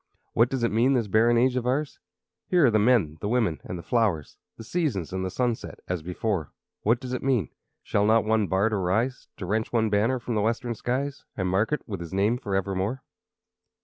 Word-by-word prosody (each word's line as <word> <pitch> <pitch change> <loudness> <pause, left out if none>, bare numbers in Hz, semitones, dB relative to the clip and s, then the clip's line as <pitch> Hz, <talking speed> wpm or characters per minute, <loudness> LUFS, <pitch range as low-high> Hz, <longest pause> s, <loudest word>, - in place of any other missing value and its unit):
What 115 +2 +4
does 130 -3 -2
it 115 - +2
mean, 120 +5 +3
this 120 -4 +2
barren 115 +4 +4
age 125 +2 +3
of 125 -1 -1
ours? 140 +3 -1 0.5
Here 175 -5 +4
are 120 - +5
the 110 - +3
men, 105 -9 +3
the - - -2
women, 110 -9 +1
and 90 - -6
the 85 - -8
flowers, 105 -11 0 0.2
The 115 - -8
seasons, 115 - -2
and 95 0 -2
the 95 - -2
sunset, 120 +3 -2
as 90 -2 -2
before. 90 0 -2 0.3
What 115 +3 +2
does 130 -1 -6
it 125 - -2
mean? 125 - +1 0.3
Shall 105 0 +1
not 110 0 +4
one 110 -2 +2
bard 100 +4 +1
arise 110 +7 0
To 95 - -5
wrench 110 +4 -1
one 110 -3 +1
banner 110 +5 +2
from 120 0 -4
the 105 - +1
western 115 +2 -1
skies, 135 +5 -3
And 95 -2 0
mark 100 +7 +1
it 150 - -1
with 100 -5 -4
his 85 +2 -6
name 105 +5 +2
forevermore? 95 +4 -2
110 Hz, 210 wpm, -26 LUFS, 95-125 Hz, 0.5 s, are